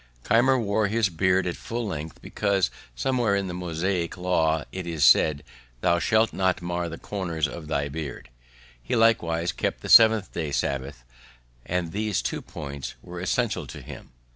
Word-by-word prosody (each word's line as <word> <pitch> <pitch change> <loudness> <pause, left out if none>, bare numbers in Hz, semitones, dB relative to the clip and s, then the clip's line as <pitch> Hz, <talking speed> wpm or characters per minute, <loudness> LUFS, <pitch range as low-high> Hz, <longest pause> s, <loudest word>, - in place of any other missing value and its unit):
Keimer 130 +3 +4
wore 110 -2 +1
his 110 -1 +1
beard 95 +2 +2
at 90 - -2
full 120 0 -4
length, 80 -5 -6
because 100 -3 0 0.2
somewhere 120 - +1
in 100 -1 0
the 90 - -5
Mosaic 90 0 -2
law 80 -4 +1
it 95 -2 -6
is 80 -4 +1
said, 75 -2 +5 0.4
"Thou 85 0 +3
shalt 110 +4 +2
not 95 -1 +1
mar 85 0 -3
the 85 - -7
corners 85 -7 -2
of 80 -1 -8
thy 70 -2 -1
beard." 70 -5 -6 0.5
He - - -2
likewise 85 -7 +2
kept - - -3
the - - -7
Seventh 110 -3 +7
day, 80 -4 -3
Sabbath; 70 -2 -2 0.6
and 90 -2 -1
these 105 0 -1
two - - -3
points 70 -3 -7
were 90 0 -8
essentials 95 - -1
with - - -10
him. - - -10
90 Hz, 165 wpm, -25 LUFS, 80-100 Hz, 0.6 s, Seventh